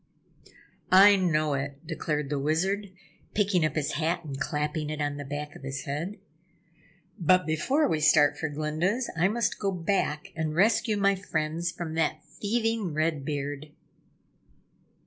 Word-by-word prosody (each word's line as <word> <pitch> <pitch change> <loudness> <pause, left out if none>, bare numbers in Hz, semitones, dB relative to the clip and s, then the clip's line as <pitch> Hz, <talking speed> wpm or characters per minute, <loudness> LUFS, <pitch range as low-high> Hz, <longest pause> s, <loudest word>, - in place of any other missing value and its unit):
"I 200 +2 +8
know 155 -6 +1
it!" 140 +2 -4
declared 150 -3 -3
the 145 - 0
Wizard, 190 +8 0 0.5
picking 200 -5 +2
up 155 -1 0
his 155 -3 0
hat 170 +2 -1
and 135 -2 -6
clapping 150 -1 -2
it 155 0 -4
on 145 -1 -1
the 145 - -5
back 145 +1 -6
of - - -11
his 135 -1 -5
head. 160 +9 -4 1.0
"But 180 +1 +4
before 260 - +1
we 160 - 0
start 150 -1 +5
for 160 - -3
Glinda's, 155 - -1
I 165 +3 +3
must 230 +3 -1
go 200 -1 0
back 180 -1 -1
and 155 -2 -2
rescue 215 +3 +3
my 200 0 +3
friends 170 -3 -2
from 165 -2 -6
that 160 -1 0
thieving 225 -5 -1
Red 155 -2 0
Beard." 145 +1 -4
160 Hz, 150 wpm, -27 LUFS, 150-190 Hz, 1.0 s, I